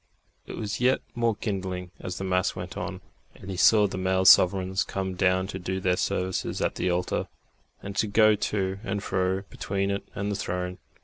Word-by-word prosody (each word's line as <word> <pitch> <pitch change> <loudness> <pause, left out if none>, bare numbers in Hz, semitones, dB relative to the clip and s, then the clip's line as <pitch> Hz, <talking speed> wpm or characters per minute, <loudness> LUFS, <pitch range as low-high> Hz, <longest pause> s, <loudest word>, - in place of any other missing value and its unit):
It - - -7
was 105 +2 -3
yet 130 +2 +4
more 115 -2 +1
kindling 95 -3 -4
as 90 - -5
the - - -4
mass 90 -1 +1
went - - -6
on, - - -5 0.3
and 95 - -9
he - - -4
saw 105 +3 +6
the 95 -2 -3
male 95 0 +1
sovereigns 95 +2 +5
come 95 -1 -3
down 95 0 +2
to 95 - -5
do 95 +1 -3
their 95 -1 +2
services 90 0 -1
at - - 0
the - - -1
altar, 90 +1 -1 0.6
and 100 0 -6
to 110 - +2
go 110 +1 +5
to 95 -2 -1
and 100 -1 -3
fro 95 0 0
between 100 0 -2
it 100 - -1
and 100 +1 -2
the - - -1
Throne. 90 -1 -3
95 Hz, 195 wpm, -27 LUFS, 95-100 Hz, 0.6 s, saw